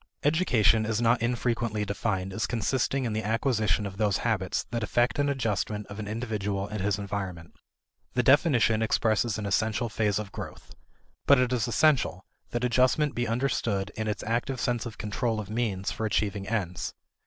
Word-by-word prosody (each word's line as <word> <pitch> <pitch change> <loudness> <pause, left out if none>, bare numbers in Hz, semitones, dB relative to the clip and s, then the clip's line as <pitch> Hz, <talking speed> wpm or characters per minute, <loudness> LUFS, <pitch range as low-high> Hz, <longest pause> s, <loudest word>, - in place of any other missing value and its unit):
Education 125 - +3
is 110 0 -1
not 120 0 +3
infrequently 115 -3 0
defined 95 -2 -2
as 105 0 -1
consisting 130 +4 0
in 115 - -1
the 110 - -1
acquisition 110 -3 +1
of 95 -1 -6
those 105 -2 +2
habits 95 -6 0
that 120 -1 -1
effect 120 +5 +1
an 145 0 +2
adjustment 105 -5 -1
of 100 - -7
an 105 - -5
individual 105 -3 -2
and 105 -1 -4
his 100 0 +1
environment. 95 -5 -5 0.6
The 125 - +3
definition 120 -5 +4
expresses 110 0 +1
an 105 - -4
essential 110 +4 0
phase 105 -2 0
of 105 -2 -4
growth. - - -8 0.5
But 140 - +7
it 125 0 +2
is 125 -1 0
essential 120 -8 +2 0.2
that 120 0 -2
adjustment 130 +4 +3
be 120 0 -1
understood 115 -5 -1
in 110 0 -3
its 105 - -2
active 120 +4 -1
sense 120 0 -1
of 115 - -9
control 110 +1 -1
of 105 -1 -6
means 110 -4 -1
for 110 - -2
achieving 100 -2 -1
ends. 90 -7 -2
110 Hz, 175 wpm, -28 LUFS, 105-120 Hz, 0.6 s, But